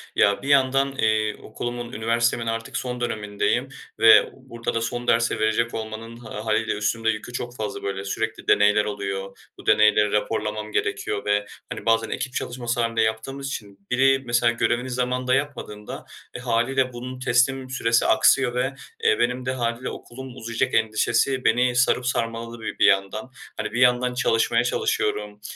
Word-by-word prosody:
Ya, 100 Hz, 0 st, +3 dB
bir 135 Hz, -, -7 dB
yandan, 135 Hz, 0 st, +3 dB
eee, 110 Hz, -2 st, +1 dB
okulumun, 120 Hz, +2 st, -5 dB
üniversitemin 115 Hz, +1 st, 0 dB
artık 115 Hz, +4 st, -3 dB
son 125 Hz, -1 st, -4 dB
dönemindeyim 105 Hz, -3 st, -1 dB, 0.3 s
ve -, -, +7 dB
burada 115 Hz, 0 st, -6 dB
da 115 Hz, -, -1 dB
son 120 Hz, +1 st, -3 dB
dersi 115 Hz, -1 st, +2 dB
verecek 110 Hz, +2 st, +1 dB
olmanın 110 Hz, +1 st, -6 dB
ha 110 Hz, -2 st, -8 dB
hâliyle 110 Hz, +1 st, +1 dB
üstümde 115 Hz, +2 st, 0 dB
yükü 115 Hz, +3 st, -3 dB
çok 120 Hz, 0 st, -5 dB
fazla. 110 Hz, -2 st, -5 dB
Böyle, 100 Hz, 0 st, -3 dB
sürekli 110 Hz, +3 st, -3 dB
deneyler 105 Hz, +1 st, +4 dB
oluyor, 100 Hz, -1 st, -4 dB, 0.2 s
bu -, -, -14 dB
deneyleri 105 Hz, -1 st, +4 dB
raporlamam 105 Hz, 0 st, -2 dB
gerekiyor 100 Hz, -, -2 dB
ve, 105 Hz, 0 st, +1 dB, 0.3 s
hani, -, -, -6 dB
bazen 115 Hz, 0 st, +2 dB
ekip 135 Hz, -1 st, -4 dB
çalışması 120 Hz, -1 st, -2 dB
hâlinde 115 Hz, -1 st, 0 dB
yaptığımız 110 Hz, +6 st, -2 dB
için 100 Hz, -6 st, -8 dB
biri, 135 Hz, +1 st, +4 dB
mesela, 120 Hz, 0 st, +3 dB
görevini 120 Hz, +2 st, 0 dB
zamanında 125 Hz, +1 st, -1 dB
yapmadığında, 135 Hz, -7 st, -5 dB, 0.3 s
eee, 125 Hz, -, -5 dB
hâliyle 125 Hz, +2 st, +1 dB
bunun 125 Hz, +1 st, -7 dB
teslim 130 Hz, +1 st, +1 dB
süresi 115 Hz, -3 st, +1 dB
aksıyor 125 Hz, +2 st, +4 dB
ve, 130 Hz, +2 st, 0 dB, 0.3 s
eee, 450 Hz, -, +3 dB
benim 125 Hz, +1 st, 0 dB
de 130 Hz, -, 0 dB
hâliyle 120 Hz, 0 st, -2 dB
okulum 130 Hz, +1 st, -9 dB
uzayacak 115 Hz, +2 st, -2 dB
endişesi 115 Hz, +4 st, +1 dB
beni 125 Hz, +2 st, +3 dB
sarıp 125 Hz, 0 st, +2 dB
sarmaladı 115 Hz, -1 st, -2 dB
bir -, -, -5 dB
bir -, -, +5 dB
yandan. 100 Hz, +6 st, -2 dB, 0.3 s
Hani, 105 Hz, 0 st, -3 dB
bir 120 Hz, -, -2 dB
yandan 125 Hz, 0 st, +4 dB
çalışmaya 115 Hz, -1 st, +2 dB
çalışıyorum, 105 Hz, -3 st, -1 dB
115 Hz, 160 wpm, -24 LUFS, 110-125 Hz, 0.3 s, ve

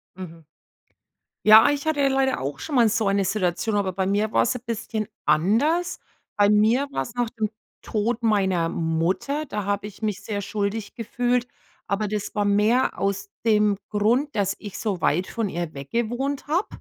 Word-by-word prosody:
Mhm. 165 Hz, -3 st, -10 dB, 1.0 s
Ja, 220 Hz, +5 st, +9 dB
ich 285 Hz, 0 st, -1 dB
hatte 295 Hz, -3 st, +1 dB
leider 265 Hz, 0 st, +1 dB
auch 140 Hz, +1 st, -4 dB
schon 300 Hz, -, -4 dB
mal 235 Hz, -3 st, +5 dB
so 220 Hz, -1 st, 0 dB
eine 195 Hz, 0 st, +2 dB
Situation, 190 Hz, +2 st, -1 dB
aber 195 Hz, -3 st, 0 dB
bei 190 Hz, 0 st, -1 dB
mir 205 Hz, +3 st, 0 dB
war -, -, +4 dB
es 240 Hz, -, 0 dB
ein 250 Hz, -, -5 dB
bisschen 220 Hz, -2 st, -3 dB, 0.2 s
anders. 235 Hz, -, +2 dB, 0.4 s
Bei 205 Hz, -1 st, +4 dB
mir 220 Hz, +7 st, +3 dB
war's 240 Hz, -, -3 dB
nach 240 Hz, -2 st, 0 dB
dem 220 Hz, -3 st, -2 dB, 0.3 s
Tod 230 Hz, +2 st, -1 dB
meiner 190 Hz, -6 st, +2 dB
Mutter, 170 Hz, -, -1 dB
da 210 Hz, -6 st, -4 dB
habe 205 Hz, +1 st, -2 dB
ich 205 Hz, +2 st, -13 dB
mich 210 Hz, -3 st, -2 dB
sehr 205 Hz, -2 st, -4 dB
schuldig 205 Hz, +1 st, -3 dB
gefühlt, 245 Hz, +1 st, -1 dB, 0.4 s
aber 200 Hz, +1 st, -1 dB
das 210 Hz, -1 st, -4 dB
war 205 Hz, -, +1 dB
mehr 210 Hz, +6 st, +2 dB
aus 200 Hz, -, -1 dB, 0.2 s
dem 210 Hz, -2 st, +3 dB
Grund, 235 Hz, +8 st, +1 dB
dass 200 Hz, -2 st, +1 dB
ich 205 Hz, -3 st, -8 dB
so 205 Hz, -5 st, -2 dB
weit 170 Hz, +3 st, +1 dB
von 225 Hz, -2 st, -2 dB
ihr 170 Hz, -3 st, -4 dB
weg 140 Hz, 0 st, -9 dB
gewohnt 245 Hz, +5 st, -2 dB
habe, 340 Hz, +7 st, 0 dB
210 Hz, 180 wpm, -24 LUFS, 195-240 Hz, 1.0 s, Ja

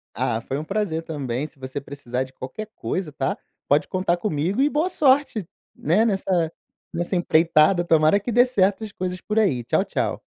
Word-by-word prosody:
Ah, 110 Hz, +1 st, -1 dB
foi 135 Hz, -, -4 dB
um -, -, -4 dB
prazer 195 Hz, -3 st, -1 dB
também. 145 Hz, -3 st, -3 dB
Se 155 Hz, -, -23 dB
você 130 Hz, +1 st, -6 dB
precisar 130 Hz, -3 st, -4 dB
de 130 Hz, -, -12 dB
qualquer 210 Hz, +14 st, -7 dB
coisa, 180 Hz, -5 st, -3 dB
tá, 135 Hz, -1 st, -1 dB, 0.3 s
pode 145 Hz, +1 st, +3 dB
contar 185 Hz, -2 st, 0 dB
comigo 185 Hz, -, -1 dB
e 290 Hz, -, +4 dB
boa 310 Hz, +5 st, 0 dB
sorte, 275 Hz, -, +2 dB, 0.3 s
né, 195 Hz, +9 st, +2 dB
nessa 190 Hz, -5 st, 0 dB, 0.4 s
nessa 175 Hz, +3 st, -2 dB
empreitada. 170 Hz, 0 st, +4 dB
Tomara 160 Hz, +3 st, +4 dB
que 235 Hz, +4 st, -4 dB
dê 245 Hz, +2 st, +5 dB
certo 205 Hz, -3 st, +1 dB
as 210 Hz, -, -6 dB
coisas 180 Hz, -1 st, -4 dB
por 215 Hz, +1 st, -1 dB
aí. 140 Hz, -, +1 dB
Tchau, -, -, +1 dB
tchau. -, -, -2 dB
175 Hz, 185 wpm, -23 LUFS, 145-210 Hz, 0.4 s, dê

